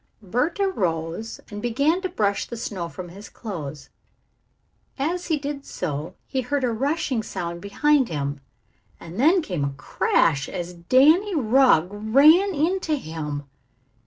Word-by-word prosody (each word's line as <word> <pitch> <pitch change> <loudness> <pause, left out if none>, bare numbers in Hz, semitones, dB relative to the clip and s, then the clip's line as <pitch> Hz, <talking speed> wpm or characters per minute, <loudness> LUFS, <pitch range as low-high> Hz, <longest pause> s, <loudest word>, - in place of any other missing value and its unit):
Bert 250 - -1
arose 185 - -1
and 205 0 -6
began 280 - +1
to 370 - -2
brush 200 - 0
the 235 - -6
snow 185 -6 -4
from 175 +2 -8
his 200 +4 -11
clothes. 155 - -7 1.1
As 340 +6 -2
he 320 -3 +1
did 285 -1 -5
so 155 - -4
he 260 - -2
heard 270 +2 -1
a 245 - +2
rushing 270 0 0
sound 170 -4 -5
behind 275 +7 +2
him 145 -2 -3 0.6
and 170 +5 -9
then 330 +6 +4
came 180 - -3
a 140 0 -1
crash 140 +1 +1
as 180 -1 -5
Danny 290 - +4
Rugg 245 - +4
ran 290 - +5
into 325 +1 +1
him. 155 - -5
225 Hz, 140 wpm, -24 LUFS, -, 1.1 s, ran